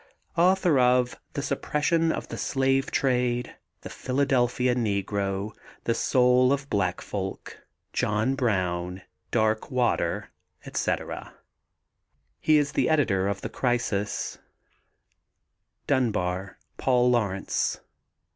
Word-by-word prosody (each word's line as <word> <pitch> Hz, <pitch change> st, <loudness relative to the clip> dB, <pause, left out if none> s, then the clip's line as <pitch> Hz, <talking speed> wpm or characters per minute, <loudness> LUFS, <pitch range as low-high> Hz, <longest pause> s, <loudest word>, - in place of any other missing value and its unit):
Author 180 Hz, -4 st, +4 dB
of 125 Hz, 0 st, +3 dB, 0.2 s
the 140 Hz, -, -3 dB
Suppression 150 Hz, +3 st, +1 dB
of -, -, -4 dB
the -, -, -5 dB
Slave 135 Hz, 0 st, +1 dB
Trade, 125 Hz, -2 st, 0 dB, 0.3 s
The -, -, -8 dB
Philadelphia 125 Hz, -2 st, +1 dB
Negro, 100 Hz, -3 st, -1 dB, 0.3 s
The 115 Hz, -, +1 dB
Souls 125 Hz, +2 st, +4 dB
of 140 Hz, 0 st, -1 dB
Black 95 Hz, -3 st, 0 dB
Folk, 95 Hz, -1 st, -5 dB, 0.3 s
John 105 Hz, +5 st, +1 dB
Brown, 90 Hz, -7 st, -1 dB, 0.3 s
Darkwater, 110 Hz, +3 st, 0 dB, 0.4 s
etc. -, -, -3 dB, 1.0 s
He 155 Hz, -, +4 dB
is 145 Hz, 0 st, +1 dB
the -, -, +1 dB
editor 110 Hz, -12 st, +2 dB
of 100 Hz, -1 st, -2 dB
The -, -, -4 dB
Crisis. 120 Hz, -5 st, -1 dB, 1.5 s
DUNBAR, 100 Hz, -8 st, 0 dB, 0.2 s
PAUL 125 Hz, -1 st, +3 dB
LAURENCE. 100 Hz, -6 st, 0 dB
125 Hz, 100 wpm, -26 LUFS, 100-135 Hz, 1.5 s, Author